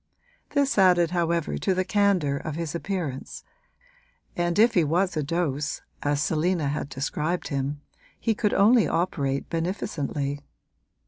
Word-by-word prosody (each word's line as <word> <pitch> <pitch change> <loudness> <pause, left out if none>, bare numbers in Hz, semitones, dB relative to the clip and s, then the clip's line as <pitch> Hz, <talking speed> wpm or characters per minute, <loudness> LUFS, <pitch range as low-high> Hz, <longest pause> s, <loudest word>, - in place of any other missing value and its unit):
This 280 -6 +2
added 175 -3 +5
however 170 -2 0
to 190 - +1
the 185 0 0
candour 190 -8 +2
of 155 +1 -5
his 165 -2 -3
appearance, 170 -7 -4 0.9
and 175 0 0
if 230 +2 +5
he 175 - +4
was 175 +4 +1
a 155 - 0
dose, 150 -2 -2 0.2
as 145 0 +1
Selina 160 -1 +1
had 145 -1 -3
described 150 +5 -2
him, 140 0 -2 0.4
he 225 - +1
could 210 -1 0
only 225 +3 +5
operate 140 -6 -1
beneficently. 150 -5 -2
170 Hz, 135 wpm, -26 LUFS, 145-185 Hz, 0.9 s, added